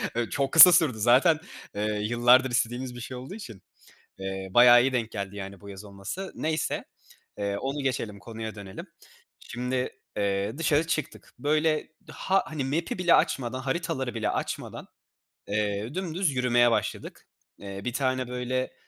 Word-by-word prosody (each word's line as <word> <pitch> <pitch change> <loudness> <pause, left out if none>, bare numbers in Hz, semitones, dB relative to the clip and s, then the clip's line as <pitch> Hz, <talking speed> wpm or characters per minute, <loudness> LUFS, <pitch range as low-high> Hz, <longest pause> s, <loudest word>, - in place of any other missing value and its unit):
Ö 120 -1 -1
çok 140 -1 -1
kısa 180 +2 +11
sürdü 155 -9 +3
zaten, 135 - +4 0.4
ııı, 105 0 -1
yıllardır 120 +3 +4
istediğimiz 120 +1 -1
bir - - -8
şey 125 +1 -7
olduğu 130 +9 -8
için, 115 - -10 0.6
eee, 95 0 -5
bayağı 120 +2 +7
iyi 135 +1 +1
denk 115 -3 -1
geldi, 100 -1 -5
yani, 100 -1 -8
bu 100 - -12
yaz 100 +1 -9
olması. 100 - -7
Neyse, 155 0 -2 0.5
eee, 100 -1 -2
onu 135 +5 -3
geçelim, 115 -6 -2
konuya 110 0 -7
dönelim. 100 -2 -9 0.5
Şimdi, 125 +1 -3 0.3
eee, 100 +4 -1
dışarı 155 0 +2
çıktık. 155 -3 -4
Böyle, 155 +3 +1 0.2
ha 195 +1 +1
hani, 150 -4 -4
map’i 160 +7 -2
bile 175 -2 +4
açmadan, 130 0 +1
haritaları 130 -3 -3
bile 110 -2 -1
açmadan, - - -5 0.6
eee, 105 +3 -2
dümdüz 180 -2 -1
yürümeye 120 -2 +3
başladık. - - -3 0.3
Eee, 100 -1 -7
bir 125 - -2
tane 130 -2 -1
böyle 125 +1 -3
125 Hz, 155 wpm, -27 LUFS, 105-140 Hz, 0.6 s, kısa